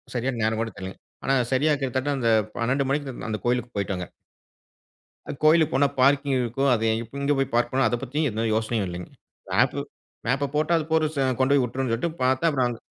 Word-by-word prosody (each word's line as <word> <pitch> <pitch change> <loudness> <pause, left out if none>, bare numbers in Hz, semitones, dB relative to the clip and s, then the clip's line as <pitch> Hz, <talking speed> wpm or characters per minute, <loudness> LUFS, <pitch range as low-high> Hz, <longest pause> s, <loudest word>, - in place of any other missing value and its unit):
சரியான 120 0 -1
நேரம் 110 0 +1
கூட 115 -2 -3
தெர்லைங்க, 95 0 -7 0.3
ஆனா 135 - +3 0.2
சரியா 150 +3 +3
கிட்டத்தட்ட 135 +2 -1
அந்த 115 -3 +1 0.3
12 130 +3 0
மணிக்கிட்ட 135 -5 -3
அந்த 110 - -2
கோயிலுக்கு 120 -1 -1
போய்ட்டோங்க. 95 -3 -2 1.2
அ - - -1
கோயிலுக்கு 155 -3 +5
போனா 140 +2 +4
பார்க்கிங் 140 0 +3
இருக்கும். 125 +4 0
அது 115 0 -1 0.2
இப் 115 +4 -11
எங்கே 140 +1 +1
போய் 135 -2 -1
பார்க் 120 0 +2
பண்ணணும், 130 0 +3
அத 120 - 0
பத்தி 145 +5 -1
எந்த 110 +1 -2
யோசனையும் 110 -3 -1
இல்லைங்க. 90 0 -7 0.4
மேப்பு - - +2 0.4
மேப்ப 135 +4 +1
போட்டா, 155 +3 +2
அது 160 - -1
போற 160 -1 +3
செ 140 - 0 0.2
கொண்டோய் 135 +1 +3
உட்ரும்னு 130 0 -3
சொல்ட்டு 165 +9 -1
பாத்தா 130 +3 +2
அப்புறம் 130 -5 +1
அங்க 120 -1 -5
130 Hz, 190 wpm, -25 LUFS, 115-140 Hz, 1.2 s, கோயிலுக்கு